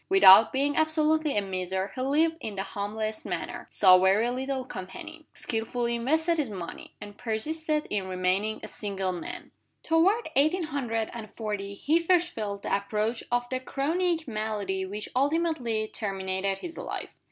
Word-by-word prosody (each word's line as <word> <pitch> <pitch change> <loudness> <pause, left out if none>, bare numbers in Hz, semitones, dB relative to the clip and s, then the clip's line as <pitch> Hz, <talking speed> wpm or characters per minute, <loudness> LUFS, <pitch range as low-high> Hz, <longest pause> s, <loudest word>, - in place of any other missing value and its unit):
Without 220 - +9
being 285 +2 +1
absolutely 315 -2 +2
a 205 - +2
miser, 190 0 -2
he 255 - -4
lived 315 +5 +2
in 215 -7 -5
the 195 - -2
humblest 215 +2 -4
manner, 175 -4 -5
saw 185 -2 +6
very 200 +6 +3
little 260 +1 -2
company; 190 - -8
skillfully 235 +1 -2
invested 320 +8 +1
his 280 -6 0
money; 185 -5 -8
and 205 0 -10
persisted 300 +7 -1
in 200 -2 -1
remaining 185 +4 0
a - - -5
single 195 -3 -3
man. 175 -2 -6 0.3
Toward 370 +8 +3
eighteen 310 +7 +3
hundred 245 -8 -2
and 225 -3 -7
forty 205 -3 -4
he 310 +10 +2
first 350 +1 +3
felt 205 - -5
the - - +1
approach 210 +3 -1
of 245 0 +1
the 255 - 0
chronic 320 +5 -1
malady 210 -4 -2
which 210 +2 -5
ultimately 275 -6 +1
terminated 195 -2 -2
his 335 - -7
life. - - -5
225 Hz, 155 wpm, -28 LUFS, 200-305 Hz, 0.3 s, Without